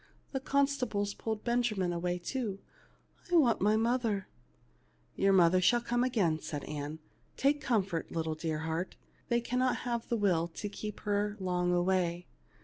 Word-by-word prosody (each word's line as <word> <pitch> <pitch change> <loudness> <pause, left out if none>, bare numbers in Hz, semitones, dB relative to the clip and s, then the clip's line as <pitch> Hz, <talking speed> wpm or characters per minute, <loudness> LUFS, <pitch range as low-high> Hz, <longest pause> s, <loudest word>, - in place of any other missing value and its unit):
The 265 - -1
consta 280 -1 +1
bles 205 0 -1
pulled 220 -1 -3
Benjamin 230 -7 +1
away 175 +1 -1
too. 210 +2 -3 0.7
I - - +4
want 260 -9 +4
my 210 +2 +4
mother." 225 -4 0 0.4
" - - -37
Your 195 0 +3
mother 185 -1 +5
shall 240 +7 +4
come 240 +1 0
again," 195 -11 +1
said 145 -3 -5
Ann. 150 +1 -5 0.2
" - - -36
Take 290 +2 +2
comfort, 195 - 0
dear - - -10
little 160 0 -2
heart, 160 +3 -3 0.3
they 235 0 +2
cannot 250 +2 +1
have 235 -2 -2
the 235 - +1
will 180 -6 +2
to 205 - -4
keep 210 +1 -6
her 205 0 0
long 180 -1 0
away. 175 -1 +1
205 Hz, 165 wpm, -32 LUFS, 175-240 Hz, 0.7 s, mother